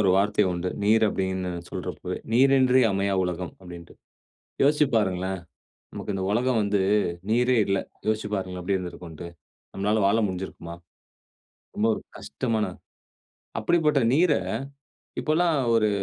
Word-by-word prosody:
ஒரு 95 -3 +4
வார்த்தை 105 +1 +3
உண்டு. 90 +1 -2 0.2
நீர் 110 +1 +4
அப்டினு 95 -2 -2 0.2
சொல்றப்பவே, - - -5
"நீரின்றி 130 +1 +5
அமையா 100 0 0
உலகம்" 90 -1 -4
அப்டின்ட்டு. 85 -2 -11 0.7
யோசிச்சு 150 +1 +4
பாருங்களேன், 95 -2 0 0.5
நமக்கு 105 - -5
இந்த 95 -1 -2
உலகம் 120 +2 +2
வந்து, 100 -1 +1 0.5
நீரே 125 +2 +3
இல்ல. 100 -1 +1 0.3
யோசிச்சு 110 -1 0
பாருங்களே, 95 -2 -4
எப்படி 95 +2 0
இருந்திருக்கும்ன்ட்டு. 85 -1 -8 0.5
நம்மளால 105 +3 +1
வாழ 100 +3 +3
முடிஞ்சுருக்குமா? 90 -2 -6 1.0
ரொம்ப 110 - +1
ஒரு - - -7 0.2
கஷ்டமான 115 -4 -1 0.9
அப்படிப்பட்ட 150 +4 +2
நீர, 165 +2 +4 0.9
இப்பல்லா 165 +3 +2 0.3
ஒரு 110 -2 +3
105 Hz, 120 wpm, -25 LUFS, 95-120 Hz, 1.0 s, நீரின்றி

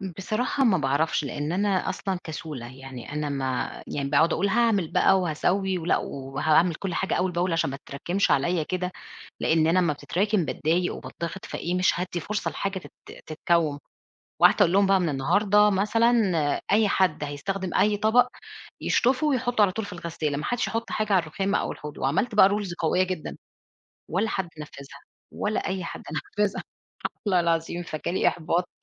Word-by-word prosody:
بصراحة 215 - -1
ما 190 -7 +4
باعرفش، 145 +2 +1
لإن 145 +3 -3
أنا 195 0 +1
أصلًا 190 -3 -2
كسولة 150 -6 -6
يعني 135 0 -9
أنا 150 0 -2
ما 130 -2 -3
يعني 140 -1 -3
باقعُد 155 +4 +3
أقول 200 - +1
هاعمل 220 -6 +2
بقى 190 -1 +4
وهاسوّي 185 +3 0
ولأ 170 +1 +1
و 135 0 -7
وهاعمل 160 +3 +3
كل 185 0 -4
حاجة 190 - -1
أول 180 0 0
بأول 175 +1 0
عشان 165 -4 +1
ما 135 - -5
تتراكِمش 175 +8 -2
عليّا 165 +4 +2
كده، 180 +2 -3 0.5
لإن 160 0 +3
أنا 175 +3 +3
أمّا 170 -4 +2
بتتركِم 190 +5 0
باتضايق 165 +5 0
وباتضغت 170 +3 -7
فإيه، 175 +1 -3
مش 180 -1 +2
هادّي 180 -1 -3
فرصة 210 +4 -2
لحاجة 195 -1 -3
تن - - -14
تتكوّم، 155 -2 0 0.6
وقعدت - - +6
أقول 170 - +4
لهم 200 0 +5
بقى: 195 -1 +4
"من 175 -3 0
النهارده 205 +9 +3
مثلًا 215 +4 +2 0.6
أي 215 0 +4
حد 185 -6 +1
هيستخدم 185 +6 -4
أي 210 0 +3
طبق 230 +4 +4 0.5
يشطُفه 260 +5 +2
ويحُطّه 245 -5 +1
على 195 -3 +5
طول 220 +1 -4
في 200 - -8
الغسّالة 165 -4 -3
ما 150 - -4
حدّش 245 -1 -1
يحُط 225 0 -3
حاجة 215 -2 0
على 185 - +5
الرُخام 195 +6 -2
أو - - 0
الحوض." 150 0 -8
وعملت 195 - 0
بقى 195 -2 +7
رولز 200 -3 -2
قوية 175 +2 +1
جدًا. 185 -4 -5 0.7
ولا 195 +7 0
حد 190 -3 -2
نفّذها 140 -2 -10 0.3
ولا 215 +1 -2
أي 190 -2 -2
حد - - -7
نفّذها 200 +5 -2 0.6
والله 185 -3 +3
العظيم 170 +1 -1
فجِا 155 0 -4
لي - - +3
إحباط 170 +1 -1
180 Hz, 175 wpm, -25 LUFS, 155-200 Hz, 0.7 s, بقى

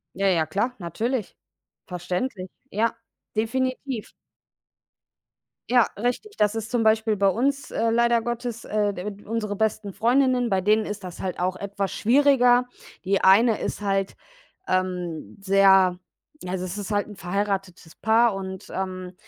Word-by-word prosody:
Ja, 195 +1 +1
ja, 170 -4 +3
klar, 205 - -1
natürlich. 215 - -3 0.5
Verständlich. 185 +3 -4 0.2
Ja, 225 +2 0 0.4
definitiv. 255 +2 -2 1.6
Ja, 245 -1 +5
richtig. 245 - -3
Das 210 +1 +2
ist 225 0 -4
zum 240 -2 +1
Beispiel 220 0 +2
bei 200 0 +3
uns, 270 +8 0
äh, 230 - 0
leider 235 0 +3
Gottes, 240 0 -4
äh, 205 -1 0
de 190 +3 -5
unsere 210 -2 -3
besten 215 -1 -1
Freundinnen, 250 0 +2
bei 190 -1 +1
denen 215 +3 +3
ist 205 -1 -6
das 180 -2 -8
halt 185 -1 -4
auch 185 +1 0
etwas 200 0 -3
schwieriger. 250 -1 +4 0.4
Die 195 +1 +1
eine 220 +4 +5
ist - - -4
halt, 195 -1 -1 0.5
ähm, 180 -3 -2
sehr 190 -2 +5 0.5
also, 180 0 -3
das 185 +2 -5
ist 205 0 -5
halt 205 -1 0
'n 210 - -10
verheiratetes 190 -2 -3
Paar, 225 0 +3
und, 190 -1 -6
ähm, 185 -1 -4
205 Hz, 145 wpm, -24 LUFS, 190-235 Hz, 1.6 s, Ja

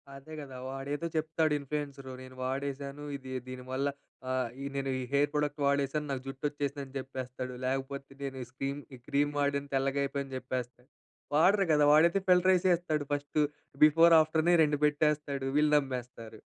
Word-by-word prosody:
అదే 140 +3 -11
కదా! 135 -3 -9
వాడేదో 140 +4 -3
చెప్తాడు 155 0 +1
ఇన్‌ఫ్లూయెన్సరు 140 -1 -5
నేను 130 0 -11
వాడేశాను, 140 +2 -3
ఇది 130 -1 -10 0.2
దీనివల్ల 130 +2 -3 0.4
ఆహ్, 130 -2 0
ఈ - - -4
నేను 135 -1 -1
ఈ - - -3
హెయిర్ 145 +1 +3
ప్రొడక్ట్ 150 0 -1
వాడేశాను, 140 +1 +1
నాకు 130 -2 -2
జుట్టు 135 +1 -8
వచ్చేసిందని 140 -1 -4
చెప్పేస్తడు. 130 -1 -6
లేకపోతే 135 +1 -3
నేను 135 -1 -4
ఈ - - -9
స్క్రీం 135 +2 -3 0.2
ఈ - - -14
క్రీమ్ 145 +1 +1
వాడన 140 0 0
తెల్లగైపోయిందని 135 0 -1
చెప్పేస్తా 125 -1 -5 0.5
వాడరు 195 +5 +5
కదా! 150 - +4
వాడైతే 170 +5 +5
ఫిల్టర్ 185 +1 +5
ఎసేస్తడు 175 -5 +1
ఫస్ట్. 145 +1 -2 0.5
బిఫోర్ 165 +2 +6
ఆఫ్టర్‌నే 160 +2 +3
2 145 -1 +1
పెట్టేస్తాడు 150 -2 +1
వీళ్ళు 150 0 +4
నమ్మేస్తరు. 125 -5 -5
140 Hz, 150 wpm, -31 LUFS, 135-150 Hz, 0.5 s, బిఫోర్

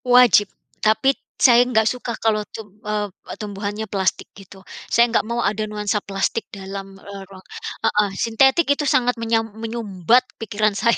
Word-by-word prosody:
Wajib, 245 -5 +6 0.3
tapi 220 +5 +3 0.3
saya 240 -2 +7
enggak 220 -3 +2
suka 250 -1 -4
kalau 220 -1 +2
tub 220 -2 -8 0.2
eee, 210 0 -1 0.3
tumbuhannya 205 0 -5
plastik 190 -2 -1
gitu. 195 -1 -14 0.3
Saya 235 - +5
enggak 230 - +1
mau 235 0 -1
ada 215 +1 0
nuansa 210 0 -1
plastik 195 +3 -2
dalam, 195 0 -8
eee, 200 0 -10
ruang 190 -1 -14 0.4
heeh. 210 -1 +2
Sintetik 265 +8 +3
itu 295 +1 -3
sangat 245 -1 +2
menyam 225 -1 0
menyumbat 225 0 +1 0.2
pikiran 215 -1 0
saya. 230 +4 +2
215 Hz, 155 wpm, -21 LUFS, 200-235 Hz, 0.4 s, saya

